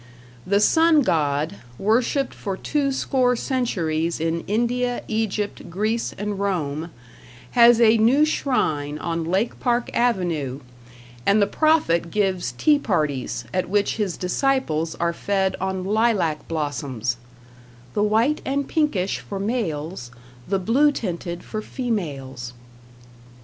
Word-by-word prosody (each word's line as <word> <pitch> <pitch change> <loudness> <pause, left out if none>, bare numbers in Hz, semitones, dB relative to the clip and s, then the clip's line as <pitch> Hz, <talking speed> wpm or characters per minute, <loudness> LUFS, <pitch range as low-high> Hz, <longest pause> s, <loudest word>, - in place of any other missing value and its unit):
The 200 +2 +3
Sun 320 +7 +5
God, 155 -1 0 0.2
worshipped 240 +6 +1
for 195 -3 -4
two 285 +3 0
score 255 -2 +1
centuries 170 - -1
in 165 +1 0
India, 245 +3 0
Egypt, 215 -2 -2
Greece 215 +6 -1
and 205 0 -3
Rome, 165 -5 -2 0.6
has 235 -1 +6
a 225 -1 +5
new 260 +7 +5
shrine 155 - 0
on 165 +1 -2
Lake 190 +7 0
Park 240 -1 0
Avenue, 170 - 0 0.6
and 200 - +4
the 200 - +5
prophet 205 - +2
gives 185 -9 0
tea 295 - +3
parties 145 - -1
at 185 -1 -1
which 205 +2 +1
his 205 -5 -1
disciples 180 - 0
are 170 0 0
fed 195 +1 0
on 190 -1 -2
lilac 205 -7 +1
blossoms 135 -7 -2 0.8
"the - - 0
white 225 +8 +2
and 280 +1 -1
pinkish 260 - 0
for 195 - -6
males, 175 - -3 0.4
the 195 - +1
blue 250 +10 +3
tinted 175 -7 -4
for 215 - -5
females". 140 - -4
200 Hz, 125 wpm, -23 LUFS, 165-240 Hz, 0.8 s, has